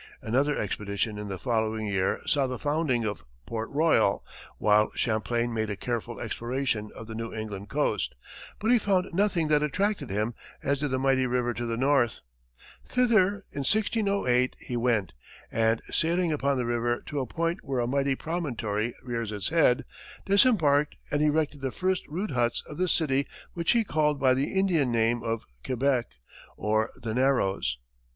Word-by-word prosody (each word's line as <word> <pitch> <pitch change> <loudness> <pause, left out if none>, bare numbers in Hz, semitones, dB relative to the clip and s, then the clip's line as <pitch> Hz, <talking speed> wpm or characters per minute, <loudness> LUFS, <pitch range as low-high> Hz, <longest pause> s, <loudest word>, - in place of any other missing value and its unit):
Another 140 +6 +1
expedition 105 +1 -2
in 105 - -5
the 95 -1 -4
following 110 -2 -1
year 95 -2 0
saw 140 -2 +2
the 130 -1 -4
founding 145 -5 0
of 105 -1 -3 0.2
Port 115 0 -4
Royal, 140 -9 +2 0.3
while 105 0 +4
Champlain 120 +1 0
made 110 -1 -1
a 105 - -2
careful 120 +2 -4
exploration 120 -1 -2
of 115 - -8
the 110 - -8
New 115 0 -4
England 105 -2 -6
coast, - - 0 0.4
but 220 +3 +1
he 245 - +6
found 190 -3 +1
nothing 185 -4 +2
that 150 -1 +4
attracted 195 +8 0
him 105 +4 -1 0.3
as 140 -1 +1
did 145 0 -1
the 130 - 0
mighty 130 -1 +2
river 120 -1 0
to 120 +1 -4
the 115 0 -2
north. 130 -3 +2 0.6
Thither, 210 -5 +2
in 140 - -5
1608, 200 - +1
he 125 - -5
went, 115 -8 +1 0.4
and 115 0 +1
sailing 170 0 +1
up 150 - -3
the 135 -3 +1
river 120 0 0
to 145 - -3
a 130 - -2
point 165 +7 -1
where 135 -2 -2
a 120 - +1
mighty 135 +2 +1
promontory 120 -10 -2
rears 115 -3 -3
its 105 -2 -2
head, 155 -7 +3 0.4
disembarked 175 - +4 0.2
and 145 - +1
erected 150 -1 +1
the 135 - -1
first 185 +6 -1
rude 185 +8 -3
huts 120 -2 0
of 150 - -9
the 185 -1 +1
city 140 -5 +2 0.3
which 170 -1 +1
he 235 -1 +3
called 150 -6 +1
by 130 -1 +4
the 135 +2 0
Indian 180 -9 +2
name 115 +1 +2
of 115 -1 -3 0.2
Quebec, 130 -1 +1 0.5
or 110 +1 +1
"The 115 -2 -4
Narrows." 105 - +1
130 Hz, 170 wpm, -28 LUFS, 115-155 Hz, 0.6 s, he